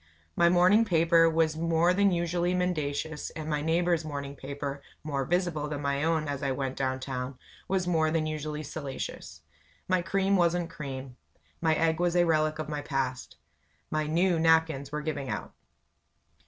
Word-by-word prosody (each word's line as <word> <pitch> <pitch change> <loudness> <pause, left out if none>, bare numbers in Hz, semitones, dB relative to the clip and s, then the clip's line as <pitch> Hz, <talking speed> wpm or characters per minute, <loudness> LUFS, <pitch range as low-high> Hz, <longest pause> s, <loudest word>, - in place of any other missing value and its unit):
My 170 - +5
morning 180 +5 +5
paper 165 -4 +4
was 160 -1 +1
more 165 +2 +2
than 200 +1 +4
usually 175 +1 0
mendacious; 160 -4 -2
and 155 -1 -5
my 150 -1 -1
neighbor's 170 +1 +1
morning 140 -2 -5
paper 140 0 -5 0.2
more 140 -3 -2
visible 175 -3 0
than 145 -1 -4
my 140 0 0
own 160 -2 +1
as 140 -1 -3
I 135 -2 0
went 135 -1 -3
down 130 -1 -1
town 130 0 -5 0.3
was 190 -1 0
more 160 -3 +2
than 160 0 0
usually 155 0 -4
salacious. 135 - -6 0.5
My 185 -1 +2
cream 195 +2 +1
wasn't 175 -1 +1
cream 135 -4 -7 0.4
my 160 -1 +3
egg 160 0 +1
was 175 0 +1
a 175 0 +5
relic 155 -1 +2
of 155 - -3
the 150 -1 -3
past. 130 -3 -3 0.5
My 155 -1 0
"new" 170 +2 +2
napkins 160 -4 +2
were 150 0 -2
giving 150 -4 -3
out. - - -4
155 Hz, 165 wpm, -28 LUFS, 140-170 Hz, 0.5 s, My